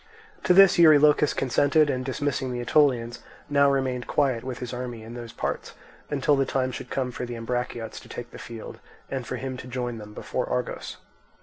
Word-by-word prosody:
To 180 Hz, -, +5 dB
this 195 Hz, -2 st, +7 dB
Eurylochus 150 Hz, -2 st, +6 dB
consented, 145 Hz, +4 st, +3 dB
and 130 Hz, 0 st, -2 dB
dismissing 135 Hz, 0 st, -2 dB
the 125 Hz, -, -3 dB
Aetolians, 120 Hz, -2 st, +2 dB, 0.3 s
now 140 Hz, 0 st, +5 dB
remained 130 Hz, -3 st, -1 dB
quiet 130 Hz, -5 st, +1 dB
with 130 Hz, -2 st, -5 dB
his 125 Hz, -1 st, -6 dB
army 125 Hz, -2 st, -5 dB
in 115 Hz, +1 st, -9 dB
those 120 Hz, -1 st, -7 dB
parts, -, -, -4 dB, 0.4 s
until 145 Hz, 0 st, +2 dB
the 135 Hz, -, +2 dB
time 130 Hz, -1 st, -1 dB
should 125 Hz, -, -7 dB
come 130 Hz, -2 st, -2 dB
for 125 Hz, +1 st, -5 dB
the 120 Hz, -, -5 dB
Ambraciots 115 Hz, -1 st, -4 dB
to -, -, -16 dB
take 120 Hz, -, -7 dB
the -, -, -10 dB
field, 115 Hz, -2 st, -9 dB, 0.3 s
and 130 Hz, -3 st, -3 dB
for -, -, -3 dB
him 130 Hz, -1 st, -5 dB
to 125 Hz, -, -9 dB
join 120 Hz, -2 st, -4 dB
them 105 Hz, 0 st, -11 dB
before -, -, -3 dB
Argos. 65 Hz, 0 st, -3 dB
125 Hz, 195 wpm, -26 LUFS, 120-140 Hz, 0.4 s, this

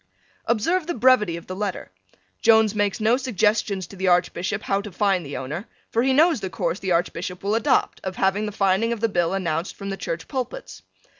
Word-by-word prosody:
Observe 310 Hz, -, +1 dB
the 345 Hz, -, -2 dB
brevity 230 Hz, -8 st, +3 dB
of 170 Hz, -, -10 dB
the 185 Hz, -, -6 dB
letter. 195 Hz, -, -4 dB, 0.5 s
Jones 220 Hz, -2 st, +5 dB
makes 205 Hz, 0 st, 0 dB
no 220 Hz, +3 st, +3 dB
suggestions 215 Hz, -6 st, 0 dB
to -, -, -13 dB
the 190 Hz, 0 st, -2 dB
Archbishop 180 Hz, +3 st, +1 dB
how 195 Hz, 0 st, 0 dB
to 205 Hz, 0 st, -8 dB
find 195 Hz, -1 st, +1 dB
the 145 Hz, -1 st, -6 dB
owner, 150 Hz, -, -5 dB, 0.2 s
for 230 Hz, -, +2 dB
he 265 Hz, +2 st, +2 dB
knows 310 Hz, +1 st, +4 dB
the 190 Hz, -, -4 dB
course 175 Hz, 0 st, -2 dB
the 190 Hz, -, -3 dB
Archbishop 175 Hz, +2 st, -1 dB
will 200 Hz, +1 st, 0 dB
adopt, 225 Hz, 0 st, +1 dB
of 190 Hz, -1 st, -4 dB
having 195 Hz, +3 st, +1 dB
the -, -, -4 dB
finding 195 Hz, +3 st, +1 dB
of 235 Hz, -, -2 dB
the 230 Hz, -, +2 dB
bill 175 Hz, -3 st, 0 dB
announced 170 Hz, -2 st, -2 dB
from 200 Hz, -1 st, -6 dB
the 195 Hz, -, -4 dB
Church 165 Hz, -3 st, -5 dB
pulpits. 270 Hz, -, -5 dB
200 Hz, 210 wpm, -23 LUFS, 185-225 Hz, 0.5 s, Jones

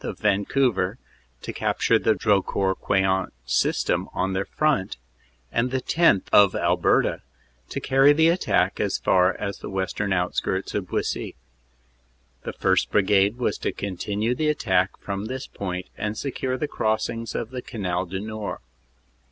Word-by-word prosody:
of -, -, -5 dB
Vancouver, 105 Hz, 0 st, +1 dB, 0.5 s
to -, -, -5 dB
capture -, -, +1 dB
the 110 Hz, -, +2 dB
Drocourt 95 Hz, -1 st, +1 dB
Queant 95 Hz, -1 st, +1 dB
system 65 Hz, -, 0 dB
on 95 Hz, +1 st, -1 dB
their 95 Hz, +1 st, -1 dB
front, 145 Hz, -11 st, 0 dB, 0.5 s
and 115 Hz, +2 st, +1 dB
the 130 Hz, +1 st, -1 dB
10th., 145 Hz, -, +3 dB
of 100 Hz, -2 st, +6 dB
Alberta, 85 Hz, 0 st, +2 dB, 0.5 s
to -, -, -3 dB
carry 135 Hz, +2 st, +5 dB
the 160 Hz, +2 st, +4 dB
attack 170 Hz, +2 st, +1 dB
as -, -, 0 dB
far 90 Hz, 0 st, +3 dB
as 100 Hz, -1 st, -4 dB
the -, -, -7 dB
western 95 Hz, +1 st, -2 dB
outskirts 95 Hz, +1 st, -1 dB
of 100 Hz, -3 st, -2 dB
Buissy. -, -, -3 dB, 1.1 s
The -, -, -6 dB
1st. -, -, +1 dB
Brigade 100 Hz, +1 st, +3 dB
was 125 Hz, -, -1 dB
to -, -, -1 dB
continue 100 Hz, +4 st, -2 dB
the 155 Hz, +4 st, 0 dB
attack 95 Hz, -10 st, +1 dB
from 100 Hz, +1 st, -5 dB
this 130 Hz, +3 st, -5 dB
point 90 Hz, -2 st, -5 dB
and 105 Hz, 0 st, -3 dB
secure 130 Hz, -1 st, -2 dB
the 150 Hz, -, -2 dB
crossings 110 Hz, -1 st, -2 dB
of 115 Hz, -, -3 dB
the 130 Hz, -1 st, -5 dB
Canal 95 Hz, -7 st, -3 dB
du 95 Hz, +2 st, -4 dB
Nord. 110 Hz, -1 st, -5 dB
100 Hz, 150 wpm, -24 LUFS, 95-125 Hz, 1.1 s, of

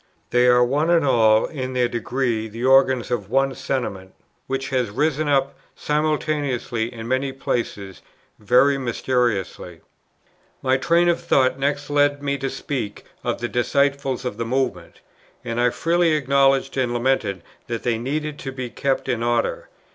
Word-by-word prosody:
They 125 Hz, 0 st, +4 dB
are 125 Hz, 0 st, +5 dB
one 145 Hz, +6 st, 0 dB
and 170 Hz, -3 st, +3 dB
all 110 Hz, -4 st, +4 dB
in 130 Hz, -4 st, -5 dB
their 125 Hz, -1 st, +2 dB
degree 120 Hz, -1 st, -2 dB
the 115 Hz, +3 st, -5 dB
organs 130 Hz, -2 st, +4 dB
of 105 Hz, -5 st, -2 dB
one 135 Hz, +2 st, +2 dB
Sentiment, 120 Hz, -8 st, -4 dB, 0.3 s
which 135 Hz, 0 st, -3 dB
has 130 Hz, -4 st, 0 dB
risen 150 Hz, +7 st, 0 dB
up 135 Hz, -1 st, +1 dB, 0.2 s
simultaneously 150 Hz, -6 st, -1 dB
in 115 Hz, -2 st, -8 dB
many 130 Hz, +2 st, 0 dB
places 110 Hz, -7 st, -4 dB, 0.4 s
very 135 Hz, +6 st, +3 dB
mysteriously." 120 Hz, -8 st, -2 dB, 0.8 s
My 130 Hz, 0 st, +3 dB
train 170 Hz, +5 st, +2 dB
of 170 Hz, -1 st, +1 dB
thought 130 Hz, 0 st, +2 dB
next 145 Hz, +1 st, -1 dB
led 145 Hz, 0 st, +2 dB
me 140 Hz, 0 st, -1 dB
to 135 Hz, -, -2 dB
speak 125 Hz, -9 st, -5 dB, 0.2 s
of -, -, -2 dB
the 120 Hz, -, -1 dB
disciples 140 Hz, +1 st, 0 dB
of 125 Hz, -4 st, -4 dB
the 115 Hz, -, -2 dB
Movement, 90 Hz, -11 st, -3 dB, 0.4 s
and 115 Hz, 0 st, -2 dB
I 125 Hz, -, +4 dB
freely 165 Hz, +4 st, +1 dB
acknowledged 135 Hz, -1 st, +2 dB
and 120 Hz, -2 st, 0 dB
lamented 120 Hz, -7 st, 0 dB, 0.2 s
that 115 Hz, -1 st, -4 dB
they 115 Hz, -2 st, 0 dB
needed 150 Hz, +4 st, -3 dB
to 135 Hz, -, -5 dB
be 130 Hz, -2 st, -6 dB
kept 135 Hz, -1 st, -1 dB
in 120 Hz, -3 st, -1 dB
order. 120 Hz, 0 st, -1 dB
130 Hz, 155 wpm, -22 LUFS, 120-140 Hz, 0.8 s, are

